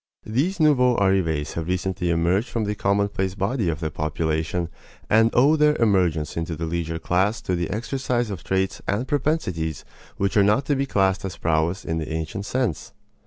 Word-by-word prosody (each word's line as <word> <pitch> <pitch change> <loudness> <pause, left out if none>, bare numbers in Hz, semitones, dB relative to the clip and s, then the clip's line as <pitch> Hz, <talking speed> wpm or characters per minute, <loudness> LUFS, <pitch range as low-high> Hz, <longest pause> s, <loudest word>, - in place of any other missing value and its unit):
These 150 - 0
nouveaux 130 -6 +4
arrivés 90 -7 +1
have 85 -1 -4
recently 90 -1 -1
emerged 85 +7 +1
from 115 - -1
the 105 0 -1
commonplace 100 -1 0
body 100 0 0
of 80 -1 -3
the 80 -1 -2
population 80 +2 -1 0.4
and 110 +1 +5
owe 140 +6 +5
their 150 -1 +4
emergence 90 - +1
into 80 0 -3
the 80 +2 -4
leisure 80 0 -2
class 95 +6 +1
to 90 - -1
the 85 -1 -2
exercise 120 +1 -2
of 90 -3 -6
traits 95 0 -1
and 110 +6 -1
propensities 90 - -1 0.3
which 100 0 0
are 100 - +6
not 105 +7 +2
to 145 - +1
be 135 +1 -1
classed 95 -4 +1
as 95 -3 -5
prowess 85 +4 0
in 80 0 -1
the 80 - -5
ancient 80 +6 -4
sense. 125 - -2
95 Hz, 180 wpm, -23 LUFS, 85-115 Hz, 0.4 s, are